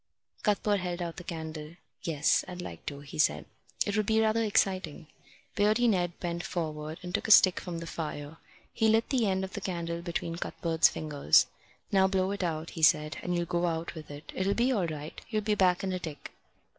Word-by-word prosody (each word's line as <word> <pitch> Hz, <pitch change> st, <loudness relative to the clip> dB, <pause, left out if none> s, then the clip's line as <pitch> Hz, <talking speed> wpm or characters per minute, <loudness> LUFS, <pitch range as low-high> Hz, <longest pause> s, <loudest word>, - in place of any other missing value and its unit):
Cuthbert 205 Hz, -1 st, +2 dB
held 180 Hz, -1 st, -3 dB
out 170 Hz, -2 st, -4 dB
the 175 Hz, -, -7 dB
candle. 160 Hz, -2 st, -6 dB, 0.3 s
"Yes, 160 Hz, -5 st, +2 dB
I'd 180 Hz, 0 st, -7 dB
like 85 Hz, -, -8 dB
to," 140 Hz, -1 st, -5 dB
he 145 Hz, +1 st, -9 dB
said. -, -, +2 dB, 0.4 s
"It 205 Hz, -, -1 dB
would 215 Hz, -1 st, +1 dB
be 220 Hz, 0 st, +3 dB
rather 220 Hz, +1 st, +2 dB
exciting." 190 Hz, -7 st, 0 dB, 0.5 s
Beardy 215 Hz, +3 st, +3 dB
Ned 175 Hz, -5 st, +1 dB
bent 170 Hz, 0 st, -3 dB
forward 155 Hz, -2 st, -4 dB
and 180 Hz, 0 st, -6 dB
took -, -, -1 dB
a -, -, -4 dB
stick 185 Hz, -3 st, +7 dB
from 175 Hz, -2 st, -5 dB
the 170 Hz, -, -5 dB
fire. 155 Hz, -2 st, -5 dB, 0.4 s
He 220 Hz, -, +2 dB
lit 225 Hz, +1 st, +3 dB
the 245 Hz, -5 st, +2 dB
end 190 Hz, -1 st, 0 dB
of 190 Hz, +1 st, -6 dB
the 205 Hz, -, -5 dB
candle 170 Hz, -3 st, -3 dB
between 170 Hz, -1 st, -3 dB
Cuthbert's 165 Hz, -1 st, +2 dB
fingers. 145 Hz, -, +3 dB, 0.5 s
"Now 190 Hz, -1 st, +5 dB
blow 190 Hz, 0 st, +1 dB
it 200 Hz, -1 st, -3 dB
out," 160 Hz, -1 st, -2 dB
he 165 Hz, -, -7 dB
said, 155 Hz, -1 st, +4 dB
"and 180 Hz, 0 st, -1 dB
you'll 175 Hz, 0 st, 0 dB
go 175 Hz, 0 st, 0 dB
out 165 Hz, 0 st, -2 dB
with 160 Hz, -2 st, -10 dB
it. 145 Hz, +1 st, -9 dB
It'll 195 Hz, +1 st, +1 dB
be 245 Hz, +3 st, +2 dB
all 200 Hz, -9 st, +1 dB
right. 155 Hz, -1 st, -7 dB
You'll 215 Hz, -2 st, -1 dB
be 210 Hz, 0 st, +1 dB
back 185 Hz, -3 st, +3 dB
in 190 Hz, -1 st, -1 dB
a 185 Hz, -, -2 dB
tick." 155 Hz, -4 st, -7 dB
175 Hz, 210 wpm, -29 LUFS, 160-195 Hz, 0.5 s, stick